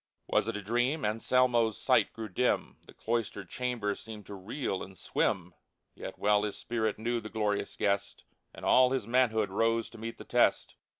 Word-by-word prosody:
Was - - +1
it 115 -2 -2
a 105 - -7
dream? 120 +7 +1
Anselmo's 115 0 +2
sight - - +3
grew 110 -1 -6
dim; 125 +6 0
The - - -13
cloistered 110 -5 -2
chamber 120 -5 -1
seemed 105 0 -9
to 100 - -9
reel 100 +2 -3
and 95 0 -9
swim; 90 -1 -1 0.4
Yet - - -8
well 105 0 +3
his 105 -1 -3
spirit 110 -3 -1
knew 120 +1 -1
the 110 - -7
glorious 105 -2 -1
guest. 100 0 -1 0.3
And - - -9
all 130 0 +6
his 130 -6 -1
manhood 110 -4 +2
rose 115 +2 +1
to - - -12
meet 115 +1 -5
the - - -9
test. - - +2
110 Hz, 180 wpm, -30 LUFS, 105-120 Hz, 0.4 s, all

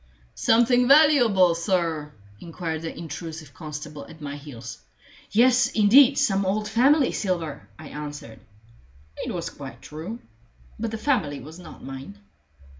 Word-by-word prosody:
"Something 245 +2 +3
valuable, 245 - +5
sir?" 165 -4 -1 0.3
inquired 165 -1 -5
the 165 - -6
intrusive 160 -2 -8
constable 150 -1 -8
at 160 - -14
my 145 -1 -6
heels. 125 - -9 0.5
"Yes, 245 +3 +4
indeed 250 +6 +6
some 200 -8 +2
old 210 +3 -1
family 260 +6 +3
silver," 170 -7 -3
I 155 -2 -10
answered. 145 -6 -8 0.8
It - - -4
was - - -4
quite - - -10
true. 160 +10 -7 0.6
But 230 +1 -2
the 225 - -5
family 215 - 0
was 155 +6 -11
not 180 - -12
mine. 135 -6 -8
170 Hz, 130 wpm, -24 LUFS, 150-230 Hz, 0.8 s, indeed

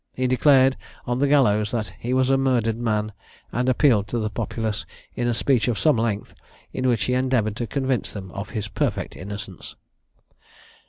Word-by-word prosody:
He 130 - -1
declared, 130 +1 +4 0.3
on 120 +1 -1
the 140 - +3
gallows, 110 -7 +3
that 105 -5 -3
he 120 - -4
was 130 +1 +2
a - - +5
murdered 125 -4 +1
man, 110 -2 -1 0.4
and 125 +2 0
appealed 125 -6 +3
to 120 - -3
the 110 -2 -2
populace, 110 -1 -3 0.3
in 120 - -1
a 120 - +2
speech 125 -1 +2
of 120 -4 0
some 150 +9 +3
length, 110 -2 -2 0.4
in 130 0 -1
which 120 -5 +2
he 125 - 0
endeavoured 125 -5 +1
to 120 - -3
convince 130 -2 -1
them 95 -3 -8
of 100 +2 -6
his 105 -1 -4
perfect - - -2
innocence. 100 +3 -8
120 Hz, 180 wpm, -23 LUFS, 105-130 Hz, 0.4 s, a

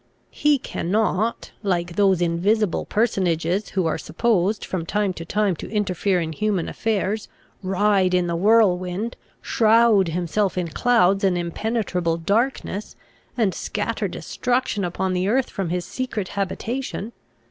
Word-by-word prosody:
He 295 -1 +3
cannot, 215 0 -1
like 175 -4 -1
those 190 -3 +3
invisible 185 +4 +1
personages 185 -3 0
who 185 - +2
are 160 - 0
supposed 205 +3 0
from 185 -3 -3
time 205 +2 0
to 165 - -7
time 205 +1 +1
to - - -7
interfere 195 -2 0
in 160 -1 -3
human 200 -1 -1
affairs, 215 -1 -1 0.3
ride 190 -1 +2
in 180 -1 +2
the 170 -1 -1
whirlwind, 195 +1 +2 0.3
shroud 225 -3 +4
himself 180 +4 -1
in 175 -2 -1
clouds 200 -1 +3
and 185 -2 +3
impenetrable 180 -1 -1
darkness, 210 +3 -1 0.4
and 210 -6 +2
scatter - - -2
destruction 250 -4 -1
upon 185 +1 -1
the 180 +1 0
earth 250 +4 +1
from 190 -4 -3
his 180 0 -2
secret 230 -7 -4
habitation." 220 +3 -3
195 Hz, 135 wpm, -23 LUFS, 180-220 Hz, 0.4 s, shroud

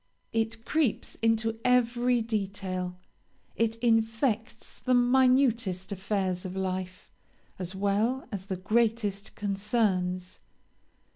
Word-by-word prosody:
It 225 0 -1
creeps 305 -8 0
into 225 0 +1
every 245 -1 +3
detail; 195 -4 -3 0.6
it 225 0 +1
infects 225 0 0
the 255 -1 +2
minutest 245 -6 +3
affairs 190 -2 -1
of 185 0 -6
life 185 -1 -4 0.5
as 185 +1 -4
well 205 +7 0
as 195 -2 -5
the 190 -2 -3
greatest 215 0 0
concerns. 195 -3 0
220 Hz, 95 wpm, -28 LUFS, 190-235 Hz, 0.6 s, every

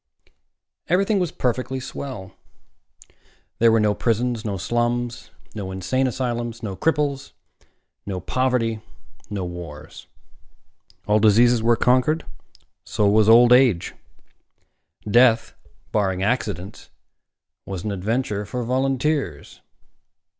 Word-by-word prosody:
Everything 195 +4 +2
was 180 -4 -1
perfectly 130 +1 -2
swell. 125 -7 -7 1.3
There 115 0 +5
were 115 - +4
no 105 -1 +2
prisons, 120 +1 -1
no 100 -3 -3
slums, 120 +4 -2 0.2
no 100 -3 -5
insane 130 +8 -1
asylums, 120 -2 -3
no 100 -3 -4
cripples, 145 0 -1 0.7
no 95 -2 -3
poverty, 115 +1 -1 0.5
no 100 -3 -3
wars. 85 -4 -9 1.0
All 105 +1 +3
diseases 115 +3 +4
were 115 +1 +3
conquered. 130 +7 +2 0.6
So 105 - 0
was 105 +1 +4
old 120 +2 +7
age. 125 -9 +3 1.1
Death, 120 +1 +4 0.4
barring 95 -3 0
accidents, 100 -4 -3 0.8
was 95 -2 -5
an 105 - -3
adventure 105 +2 -2
for 120 +4 -4
volunteers. 130 - -1
115 Hz, 105 wpm, -22 LUFS, 105-130 Hz, 1.3 s, old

